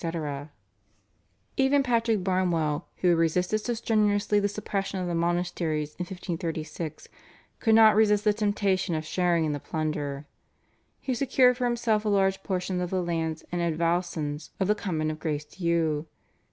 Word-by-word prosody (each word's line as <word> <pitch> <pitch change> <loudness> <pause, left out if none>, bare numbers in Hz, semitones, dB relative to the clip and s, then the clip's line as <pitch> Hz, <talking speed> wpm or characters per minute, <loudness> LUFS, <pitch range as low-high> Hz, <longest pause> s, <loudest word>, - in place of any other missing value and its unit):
Even 275 +1 +3
Patrick 230 -5 +1
Barnewall, 175 -5 0 0.2
who 180 - +4
had 170 -1 +4
resisted 180 +6 +1
so 240 +2 -2
strenuously 210 -2 +2
the 205 - +1
suppression 200 -2 -3
of 180 - -2
the 175 - -2
monasteries 170 -3 -1
in 180 - -2
1536, 165 -3 -5 0.5
could 225 -2 +4
not 220 -1 +7
resist 210 -1 +4
the 210 - +4
temptation 200 -4 0
of 155 0 -3
sharing 170 -1 +1
in 155 - 0
the 145 - -3
plunder. 150 -2 -3 0.7
He 260 - -2
secured 250 -1 +3
for 250 - 0
himself 235 -3 +1
a 215 - 0
large 195 -1 +2
portion 185 -1 -2
of 180 - -2
the 185 -1 -1
lands 165 -2 -2
and 175 0 -1
advowsons 165 -2 -1
of 190 - +1
the 210 - +4
Convent 160 -7 -2
of 155 - -7
Grace 150 -1 -2
Dieu. 165 -2 -1
180 Hz, 155 wpm, -27 LUFS, 160-210 Hz, 0.7 s, not